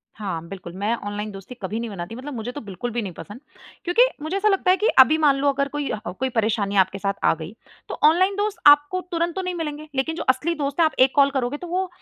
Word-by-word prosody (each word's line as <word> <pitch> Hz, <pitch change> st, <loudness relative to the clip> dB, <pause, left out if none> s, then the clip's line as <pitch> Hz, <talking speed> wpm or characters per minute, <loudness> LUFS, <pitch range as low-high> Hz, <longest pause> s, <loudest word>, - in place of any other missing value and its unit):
हाँ, 180 Hz, -6 st, -5 dB
बिल्कुल। 180 Hz, -2 st, -9 dB
मैं 205 Hz, +5 st, -1 dB
ऑनलाइन 205 Hz, +1 st, -4 dB
दोस्ती 195 Hz, +6 st, -10 dB
कभी 205 Hz, +4 st, -3 dB
नहीं 235 Hz, 0 st, -4 dB
बनाती 190 Hz, +1 st, -7 dB
मतलब 275 Hz, +4 st, -7 dB
मुझे 235 Hz, 0 st, -5 dB
तो 290 Hz, -, -7 dB
बिल्कुल 205 Hz, +3 st, -6 dB
भी 240 Hz, +1 st, -2 dB
नहीं 195 Hz, -4 st, -6 dB
पसंद। 205 Hz, +7 st, -10 dB, 0.4 s
क्योंकि 420 Hz, +8 st, +4 dB
मुझे 315 Hz, +5 st, -3 dB
ऐसा 425 Hz, -, +1 dB
लगता 390 Hz, -2 st, +3 dB
है 370 Hz, -, +3 dB
कि 430 Hz, -, +1 dB
अभी 285 Hz, +5 st, +7 dB
मान 295 Hz, -3 st, +4 dB
लो 280 Hz, +1 st, +1 dB
अगर 280 Hz, 0 st, 0 dB
कोई 290 Hz, 0 st, -4 dB
ह 215 Hz, -, -3 dB
अ, -, -, -3 dB
कोई 260 Hz, +7 st, -3 dB
परेशानी 220 Hz, -3 st, 0 dB
आपके 190 Hz, 0 st, +2 dB
साथ 200 Hz, 0 st, -1 dB
आ -, -, +4 dB
गई, 160 Hz, +4 st, -8 dB, 0.4 s
तो -, -, -6 dB
ऑनलाइन 370 Hz, +6 st, +4 dB
दोस्त 410 Hz, 0 st, -1 dB
आपको 290 Hz, +5 st, +5 dB
तुरंत 340 Hz, 0 st, -1 dB
तो 380 Hz, -, -2 dB
नहीं 365 Hz, -1 st, -3 dB
मिलेंगे। 305 Hz, -2 st, -5 dB
लेकिन 270 Hz, +5 st, -1 dB
जो 335 Hz, -, -4 dB
असली 260 Hz, +6 st, +2 dB
दोस्त 285 Hz, +1 st, -3 dB
है 330 Hz, -, +6 dB
आप 315 Hz, -, 0 dB
एक 260 Hz, 0 st, +6 dB
कॉल 280 Hz, -1 st, +5 dB
करोगे 265 Hz, +1 st, -2 dB
तो 355 Hz, -, -8 dB
वह 370 Hz, +2 st, -1 dB
265 Hz, 265 wpm, -23 LUFS, 210-320 Hz, 0.4 s, अभी